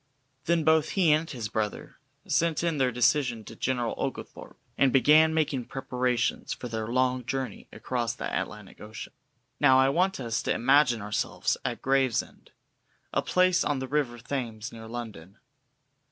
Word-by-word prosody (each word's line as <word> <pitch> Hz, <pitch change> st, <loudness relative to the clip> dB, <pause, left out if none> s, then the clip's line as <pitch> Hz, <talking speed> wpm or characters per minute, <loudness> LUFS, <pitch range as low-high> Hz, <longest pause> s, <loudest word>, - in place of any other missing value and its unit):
Then 170 Hz, -1 st, +2 dB
both 160 Hz, 0 st, +3 dB
he 175 Hz, -5 st, +4 dB
and 155 Hz, +2 st, +2 dB
his 120 Hz, -6 st, -4 dB
brother 110 Hz, -1 st, -4 dB, 0.3 s
sent 165 Hz, 0 st, +1 dB
in 165 Hz, -4 st, 0 dB
their 130 Hz, -1 st, +2 dB
decision 125 Hz, -1 st, +1 dB
to -, -, -11 dB
General 120 Hz, -3 st, -1 dB
Oglethorpe, -, -, -6 dB, 0.2 s
and 135 Hz, -2 st, +3 dB
began 155 Hz, +4 st, +5 dB
making 150 Hz, -6 st, 0 dB
preparations 125 Hz, -2 st, -1 dB
for 125 Hz, -, -7 dB
their 110 Hz, -2 st, -4 dB
long 130 Hz, +1 st, +1 dB
journey 125 Hz, -2 st, -4 dB
across 120 Hz, -2 st, -3 dB
the -, -, -5 dB
Atlantic 105 Hz, -2 st, -6 dB
Ocean. 105 Hz, +1 st, -9 dB, 0.5 s
Now 130 Hz, -, +6 dB
I 130 Hz, 0 st, +5 dB
want 185 Hz, +5 st, +1 dB
us 115 Hz, -2 st, -2 dB
to -, -, 0 dB
imagine 125 Hz, -3 st, +3 dB
ourselves 105 Hz, 0 st, -1 dB
at -, -, -4 dB
Gravesend, 135 Hz, -3 st, 0 dB, 0.6 s
a -, -, +2 dB
place 185 Hz, 0 st, +2 dB
on 145 Hz, -, 0 dB
the 130 Hz, 0 st, -4 dB
river 140 Hz, -4 st, -1 dB
Thames 115 Hz, -2 st, -5 dB
near 110 Hz, -1 st, -10 dB
London. 110 Hz, -6 st, -8 dB
130 Hz, 155 wpm, -27 LUFS, 115-150 Hz, 0.6 s, Now